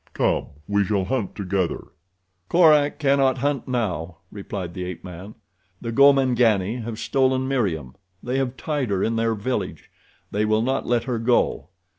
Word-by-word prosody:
Come, -, -, +1 dB, 0.2 s
we 100 Hz, 0 st, +2 dB
shall 100 Hz, -1 st, 0 dB
hunt 125 Hz, -5 st, -2 dB
together." 95 Hz, -3 st, -2 dB, 0.6 s
"Korak 150 Hz, -4 st, +5 dB
cannot 135 Hz, -3 st, +2 dB
hunt 140 Hz, 0 st, -1 dB
now," 90 Hz, -10 st, -2 dB
replied 100 Hz, -3 st, -6 dB
the 90 Hz, -, -5 dB
ape 90 Hz, -2 st, -6 dB
man. 90 Hz, +3 st, -9 dB, 0.4 s
"The 115 Hz, -, -5 dB
Gomangani 125 Hz, -5 st, +4 dB
have 115 Hz, -1 st, -5 dB
stolen 130 Hz, +1 st, +1 dB
Meriem. 90 Hz, -, -1 dB, 0.3 s
They 130 Hz, +2 st, -1 dB
have 130 Hz, -1 st, -2 dB
tied 145 Hz, -6 st, -2 dB
her 100 Hz, -1 st, 0 dB
in 115 Hz, -, 0 dB
their 115 Hz, 0 st, +1 dB
village. 105 Hz, -2 st, -4 dB, 0.4 s
They 105 Hz, -, 0 dB
will 110 Hz, +1 st, +2 dB
not 130 Hz, +2 st, -1 dB
let 120 Hz, -1 st, +1 dB
her 125 Hz, -3 st, -2 dB
go. 115 Hz, -, +1 dB
115 Hz, 155 wpm, -23 LUFS, 100-130 Hz, 0.6 s, Korak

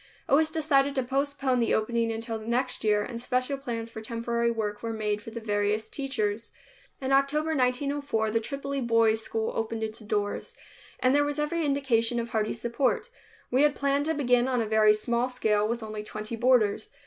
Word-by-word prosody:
It -, -, 0 dB
was 310 Hz, +2 st, +5 dB
decided 285 Hz, -3 st, +2 dB
to 265 Hz, -, +1 dB
postpone 275 Hz, 0 st, 0 dB
the 230 Hz, -, +2 dB
opening 230 Hz, +1 st, 0 dB
until 225 Hz, 0 st, -4 dB
the 215 Hz, -, -10 dB
next 250 Hz, +2 st, 0 dB
year 210 Hz, -1 st, +3 dB
and 235 Hz, 0 st, -6 dB
special 255 Hz, +3 st, 0 dB
plans 235 Hz, -4 st, -5 dB
for 220 Hz, -, -7 dB
temporary 235 Hz, +1 st, -1 dB
work 210 Hz, -3 st, -2 dB
were 230 Hz, -1 st, -3 dB
made 210 Hz, -1 st, -1 dB
for 225 Hz, -, -9 dB
the 230 Hz, +1 st, -6 dB
various 210 Hz, 0 st, -1 dB
teachers. 230 Hz, -6 st, -2 dB, 0.5 s
In 265 Hz, 0 st, -2 dB
October 300 Hz, +4 st, +2 dB
1904 255 Hz, -3 st, 0 dB
the 225 Hz, -, +2 dB
Tripoli 275 Hz, +3 st, -4 dB
Boys' 230 Hz, -2 st, +3 dB
School 220 Hz, 0 st, -2 dB
opened 225 Hz, 0 st, -2 dB
its 220 Hz, 0 st, -4 dB
doors, 205 Hz, -2 st, -3 dB, 0.4 s
and 255 Hz, +1 st, +4 dB
there 290 Hz, +1 st, +4 dB
was 290 Hz, 0 st, -2 dB
every 300 Hz, +3 st, 0 dB
indication 245 Hz, -5 st, +1 dB
of 235 Hz, 0 st, -3 dB
hearty 215 Hz, -1 st, 0 dB
support. 235 Hz, -, -1 dB, 0.4 s
We 255 Hz, +2 st, +3 dB
had 295 Hz, -1 st, +4 dB
planned 280 Hz, +1 st, +1 dB
to 320 Hz, -, +1 dB
begin 250 Hz, -3 st, +3 dB
on 255 Hz, -2 st, +1 dB
a 225 Hz, -, +1 dB
very 215 Hz, 0 st, +5 dB
small 235 Hz, +3 st, 0 dB
scale 215 Hz, -4 st, +1 dB
with 235 Hz, +1 st, -3 dB
only 215 Hz, -1 st, -5 dB
twenty 215 Hz, +2 st, -5 dB
boarders. 245 Hz, -, +2 dB
235 Hz, 195 wpm, -27 LUFS, 220-275 Hz, 0.5 s, was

